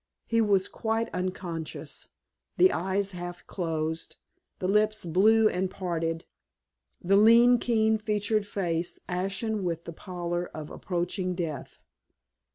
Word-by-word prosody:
He 230 0 +2
was 200 -3 +3
quite 225 +1 -2
unconscious, 180 -3 -4 0.5
the 370 +1 +6
eyes 195 +1 -1
half 175 -1 -7
closed, 160 -2 -3 0.4
the 185 - -2
lips 210 +1 +2
blue 215 +6 +5
and 185 -2 0
parted, 165 -3 -3 0.7
the 190 +3 +2
lean, 235 +3 +7
keen 220 -2 +2
featured 210 0 0
face 175 -4 -2
ashen 195 +3 -2
with 170 -2 -2
the 170 - -6
pallor 175 0 -4
of 155 -1 -7
approaching 180 +1 -2
death. 160 -6 -5
185 Hz, 120 wpm, -28 LUFS, 175-215 Hz, 0.7 s, lean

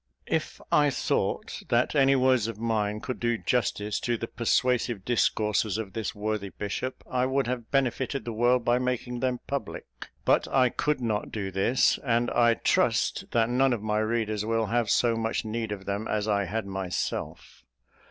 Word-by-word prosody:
If - - -2
I 145 -1 +5
thought 135 - -1
that 120 +1 +2
any 135 -2 +4
words 130 -4 +3
of 115 -2 -5
mine 105 -2 -1
could 130 - -5
do 120 -1 +1
justice 105 -3 -1
to 120 -1 -1
the 115 - -3
persuasive 120 -3 0
discourses 105 -3 +1
of 105 -4 -5
this 110 -3 -3
worthy 105 -1 -2
bishop, 105 +7 -5
I 125 0 0
would 135 0 +1
have 120 -2 -4
benefited 135 0 0
the 120 - -4
world 120 +2 +2
by 120 +1 +3
making 125 -1 -2
them 125 -1 -1
public; 140 -1 -4 0.4
but - - +3
I 130 -2 +3
could 150 +2 -1
not 110 -3 -2
do 100 -3 -4
this; 100 +8 +2
and 120 -2 +1
I 120 -1 +4
trust - - +1
that 115 0 +1
none 130 +1 +3
of 110 -3 -4
my 105 0 0
readers 110 -1 -1
will 115 +1 0
have 115 +1 0
so 115 +1 +3
much 115 0 -2
need 110 0 -3
of 95 -2 -5
them 100 +2 -3
as 105 0 -1
I 100 -2 +1
had 110 +3 -3
myself. 95 -2 -4
115 Hz, 180 wpm, -27 LUFS, 105-125 Hz, 0.4 s, I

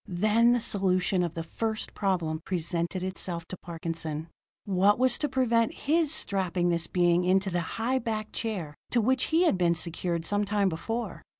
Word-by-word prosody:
Then 215 +6 +3
the 245 - +2
solution 185 -3 +2
of 170 -2 -2
the 165 - -3
first 220 +6 -3
problem 175 -6 -1
presented 175 0 -2
itself 185 -2 -3
to 185 - -6
Parkinson. 165 -2 -4 0.4
What 200 +1 +3
was 255 0 +2
to 295 - 0
prevent 235 -3 +1
his 315 +1 +2
strapping 185 - -1
this 170 -1 +1
being 175 -1 +2
into 190 +2 +2
the 175 0 0 0.2
high 250 +4 +1
backed 215 -3 -4
chair 190 -10 -3 0.2
to 240 - +2
which 255 +3 +2
he 325 +2 +3
had 260 - +2
been 170 -1 +3
secured 170 0 -2
some 205 +4 +1
time 205 -1 +1
before? 225 +8 -4
190 Hz, 175 wpm, -28 LUFS, 170-225 Hz, 0.4 s, Then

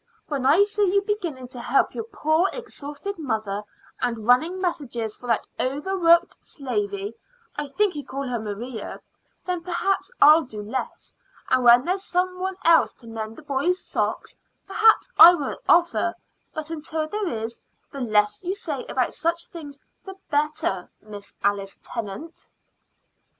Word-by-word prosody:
"When 275 -3 0
I 340 +8 +6
see 410 -2 +1
you 400 - +4
beginning 350 - -3
to 250 -1 -8
help 245 +3 +2
your 450 - -4
poor, 350 -4 +1
exhausted 395 -4 -7
mother, 215 -8 -2 0.4
and 230 -3 -2
running 315 +10 +3
messages 250 - -3
for 245 - -11
that 230 -2 +1
overworked 340 +5 +2
slavey 205 - -3 0.4
I 295 0 -3
think 405 +7 +1
you 295 -2 -5
call 275 0 -5
her 245 -2 -2
Maria 220 +2 -6 0.5
then 360 -1 -2
perhaps 360 +5 -1
I'll 305 +3 +8
do 215 -8 -8
less. 255 +5 -5 0.4
And 255 -1 +4
when 240 +2 +7
there's 375 +2 -1
some 365 0 -1
one 380 0 -3
else 330 0 +5
to 235 - -16
mend 225 -1 -6
the 310 - -13
boys' 295 +6 0
socks, - - -2 0.3
perhaps 435 +3 +4
I 350 +2 +11
won't 290 -5 -4
offer; 345 0 +3 0.4
but 310 0 -6
until 315 0 -3
there 415 +3 -2
is, 225 -3 -4 0.3
the 275 - -6
less 210 -3 +2
you 370 +2 -2
say 300 -9 -4
about 255 -2 0
such 335 +1 -1
things 290 -4 -10 0.2
the 385 -1 -9 0.2
better, 290 -11 0
Miss 205 -1 -11
Alice 200 -1 -1
Tennant." 230 - -7
295 Hz, 155 wpm, -24 LUFS, 235-355 Hz, 0.5 s, I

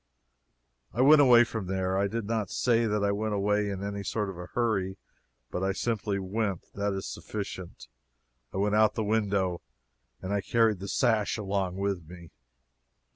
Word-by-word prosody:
I 120 - 0
went 145 +3 +8
away 120 -3 +7
from 110 -5 -4
there. 95 0 -1
I 100 +1 +2
do 115 +3 -3
not 110 -2 -2
say 115 -2 +2
that 105 -1 0
I 100 - +2
went 105 +1 -1
away 105 +1 +1
in 100 -1 -4
any 100 0 -3
sort 105 0 -2
of 90 - -11
a 90 - -7
hurry, 100 -6 0 0.5
but 90 - -3
I 95 0 +1
simply 105 -1 -1
went 100 -1 -2
that 100 0 -1
is 95 0 -4
sufficient. 100 -4 -6 0.6
I - - -5
went 105 +1 +1
out 105 0 +4
at - - -32
the 110 - -1
window, 100 -4 0 0.6
and 95 +2 -4
I 100 - +1
carried 110 -1 +2
the 100 - -6
sash 110 -1 +1
along 95 -3 -2
with 95 -4 -2
me. 85 -2 -12
100 Hz, 180 wpm, -28 LUFS, 95-110 Hz, 0.6 s, went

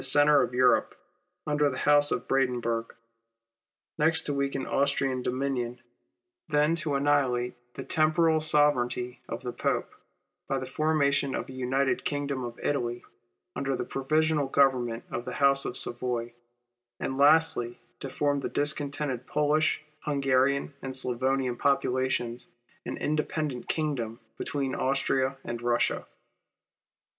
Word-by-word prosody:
05 - - -4
the - - +4
centre 145 0 +5
of 125 - -2
Europe, 125 0 +3 0.5
under 150 -1 +2
the 130 - -5
house 145 0 +5
of 125 - -2
Brandenburg; 120 -4 0 1.0
next 160 +2 +3
to 145 - -1
weaken 140 -1 -1
Austrian 135 -2 0
dominion; 125 -1 -2 0.7
then 150 0 +2
to 155 -3 -2
annihihite 135 -4 +1 0.2
the - - -5
temporal 160 +1 +2
sovereignty 125 -5 +1
of 115 +3 -5
the 125 -1 -4
Pope, - - -1 0.5
by 135 - 0
the 130 - -4
formation 145 -1 +1
of - - -4
a - - -8
United 130 +1 0
Kingdom 140 -3 -2
of 120 -1 -6
Italy 120 -4 -1 0.5
under 135 -1 -1
the - - -3
provisional 155 +1 +1
government 130 -4 +2
of 120 -2 -3
the - - -6
house 140 -1 +4
of 125 - -4
Savoy; 120 -1 -2 0.7
and 135 - -3
lastly, 145 -5 +4 0.2
to 135 - -6
form 145 +1 0
of - - -3
the - - -3
discontented 145 -3 -1
Polish, 150 +1 +1 0.2
Hungarian, 140 0 +1
and 130 -1 -5
Slavonian 130 0 0
populations, 130 -3 0 0.4
an - - -4
independent 150 -3 -2
kingdom 130 -8 -2 0.2
between 135 -2 -2
Austria 135 0 0
and 120 - -4
Kussia. 120 0 0
135 Hz, 135 wpm, -28 LUFS, 125-145 Hz, 1.0 s, centre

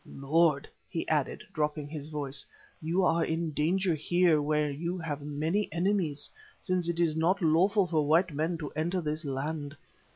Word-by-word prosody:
Lord," 150 +1 +2 0.2
he - - -3
added, - - 0
dropping 150 -1 -1
his 150 -1 -6
voice, 140 -3 -3 0.4
"you 170 +4 +1
are 165 -1 +3
in 165 0 -1
danger 175 +5 +1
here 165 0 +3
where 150 0 +1
you 170 +6 -3
have 155 -4 -4
many 155 +8 -1
enemies, 170 -4 0 0.3
since 180 -3 -1
it 170 0 -2
is 165 -3 +2
not 170 +5 +2
lawful 185 +5 +3
for 155 -4 0
white 165 +2 +3
men 160 +4 -1
to 150 -3 -6
enter 170 +5 -1
this 155 -1 -3
land. 145 +2 -3
160 Hz, 165 wpm, -29 LUFS, 150-175 Hz, 0.4 s, are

